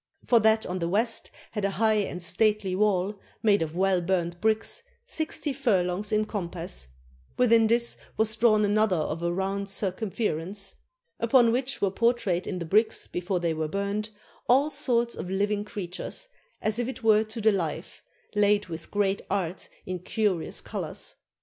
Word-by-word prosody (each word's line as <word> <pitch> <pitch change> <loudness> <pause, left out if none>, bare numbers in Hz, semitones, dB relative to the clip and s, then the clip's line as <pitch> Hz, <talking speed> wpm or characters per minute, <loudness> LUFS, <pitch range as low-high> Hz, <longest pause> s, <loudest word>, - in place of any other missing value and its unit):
For 235 - +5
that 220 0 +3
on 180 +1 -3
the 170 -1 -1
west 225 +5 0 0.2
had 210 -2 -3
a 200 - +2
high 215 +2 +2
and 180 -3 -2
stately 210 +1 +1
wall, 200 0 +1 0.2
made 205 -3 +4
of 160 +1 -3
well 190 -1 +3
burnt 175 -1 -1
bricks, 220 0 0 0.2
sixty 315 - -2
furlongs 200 -7 0
in 215 0 +2
compass; 175 - -4 0.5
within 230 -2 +5
this 235 +1 +2 0.2
was 220 0 +2
drawn 215 -2 +4
another 210 -1 +3
of 155 0 -2
a 170 0 0
round 195 +2 -2
circumference, 195 -1 -2 0.5
upon 235 0 +5
which 260 +3 -1
were 195 - +3
portrayed 230 -5 +1
in 185 - -3
the 170 - -4
bricks 215 +7 +2
before 180 +1 -2
they 170 -2 0
were 155 0 -2
burnt, 200 +4 -2 0.4
all 275 +5 +4
sorts 240 -5 +1
of 180 - -6
living 205 +2 0
creatures, 200 - -6 0.4
as 215 +2 +1
if 240 - 0
it 260 -2 -6
were 215 -1 +5
to 220 +2 -6
the 220 0 +4
life, 165 -4 -3 0.3
laid 205 -1 +3
with 165 0 -7
great 200 -1 +1
art 185 -3 -2 0.2
in 185 -1 -4
curious 190 -2 -1
colors. - - -5
205 Hz, 165 wpm, -27 LUFS, 180-220 Hz, 0.5 s, For